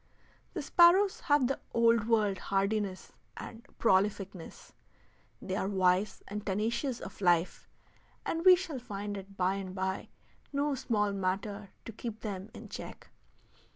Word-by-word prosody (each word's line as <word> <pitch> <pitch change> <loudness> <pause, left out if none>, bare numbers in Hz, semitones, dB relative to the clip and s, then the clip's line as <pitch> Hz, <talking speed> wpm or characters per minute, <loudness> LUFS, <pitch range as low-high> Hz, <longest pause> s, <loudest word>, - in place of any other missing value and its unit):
The 330 - -2
sparrows 360 +6 +5
have 290 -3 +3
the 270 +2 -1 0.2
Old 230 -1 +4
World 210 -4 +2
hardiness 195 0 -1 0.2
and 225 - -8 0.2
prolificness; 195 -3 0 0.7
they 190 - -4
are 195 - -1
wise 190 +1 +1
and 210 0 -5
tenacious 225 +6 -1
of - - -9
life, 175 -1 +2 0.6
and 330 0 -1
we 370 0 +9
shall 335 -7 -5
find 205 -4 -5
it 195 0 -9
by 185 +1 +1
and 190 -1 -6
by 190 0 -2 0.4
no 285 0 0
small 210 -6 0
matter 200 +2 -2 0.2
to - - -6
keep 225 0 -6
them 200 -2 -5
in - - -9
check. - - -9
205 Hz, 140 wpm, -31 LUFS, 195-235 Hz, 0.7 s, we